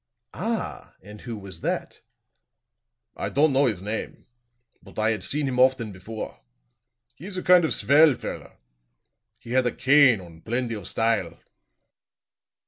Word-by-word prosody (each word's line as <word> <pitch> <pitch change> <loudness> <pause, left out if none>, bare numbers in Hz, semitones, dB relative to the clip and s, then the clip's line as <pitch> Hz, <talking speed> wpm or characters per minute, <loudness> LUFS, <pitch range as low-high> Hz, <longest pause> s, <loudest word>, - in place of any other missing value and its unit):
"Ah! - - -4
And 105 +1 -12
who 115 -2 -6
was 95 -4 -9
that?" - - -3 1.1
"I - - -3
don't 145 +1 +3
know 135 +1 +4
his 100 -6 -2
name; 105 +2 -5 0.6
but - - -16
I 110 +1 +2
had 110 - -3
seen 145 0 -1
him 125 -1 -2
often 130 -4 +3
before. 105 +4 -8 0.7
He 150 +9 -11
is 195 -2 -6
a 185 - -3
kind 180 -1 +6
of 160 - +1
svell 145 0 +5
feller. - - -8 0.8
He 115 - -12
had 130 0 +2
a - - 0
cane 135 -4 +5
und 85 -3 -14
plendy 120 +1 -2
of 105 -4 -8
style." 110 -7 -1
120 Hz, 150 wpm, -25 LUFS, 105-140 Hz, 1.1 s, kind